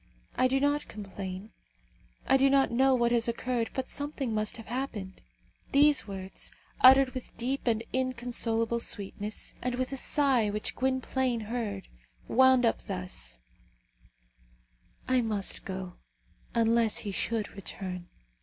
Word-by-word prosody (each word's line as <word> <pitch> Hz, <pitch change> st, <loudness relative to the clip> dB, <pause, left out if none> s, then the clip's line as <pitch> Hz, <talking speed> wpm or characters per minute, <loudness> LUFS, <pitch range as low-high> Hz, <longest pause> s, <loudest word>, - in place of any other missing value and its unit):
I 255 Hz, -, +4 dB
do 265 Hz, +1 st, +1 dB
not 290 Hz, +1 st, +1 dB
complain. 195 Hz, -1 st, -7 dB, 0.7 s
I -, -, +4 dB
do 270 Hz, +1 st, +5 dB
not 275 Hz, -2 st, +3 dB
know 260 Hz, +2 st, +4 dB
what 235 Hz, -1 st, +2 dB
has 235 Hz, -1 st, +2 dB
occurred, 235 Hz, 0 st, -1 dB
but 260 Hz, -1 st, -2 dB
something 285 Hz, -4 st, -3 dB
must 215 Hz, +1 st, 0 dB
have 225 Hz, -, -9 dB
happened." 225 Hz, -6 st, -5 dB, 0.5 s
These 285 Hz, -4 st, +5 dB
words, 190 Hz, -1 st, -6 dB, 0.3 s
uttered 265 Hz, 0 st, +7 dB
with 255 Hz, -2 st, -8 dB
deep 260 Hz, +3 st, -2 dB
and 225 Hz, -1 st, +2 dB
inconsolable 235 Hz, -2 st, 0 dB
sweetness, 210 Hz, -1 st, -2 dB
and 250 Hz, -1 st, -1 dB
with 255 Hz, +1 st, -2 dB
a 270 Hz, -, -2 dB
sigh 265 Hz, -6 st, +2 dB
which 210 Hz, +1 st, -3 dB
Gwynplaine 260 Hz, -2 st, 0 dB
heard, 215 Hz, -3 st, -4 dB, 0.4 s
wound 260 Hz, -1 st, +5 dB
up 230 Hz, -, +1 dB
thus, 180 Hz, -, -4 dB, 1.7 s
"I 255 Hz, -1 st, +3 dB
must 210 Hz, -4 st, -1 dB
go, 185 Hz, -1 st, -6 dB, 0.6 s
unless 230 Hz, -1 st, +3 dB
he 205 Hz, -, -2 dB
should 215 Hz, +2 st, -1 dB
return." 185 Hz, -2 st, -6 dB
235 Hz, 135 wpm, -29 LUFS, 205-260 Hz, 1.7 s, uttered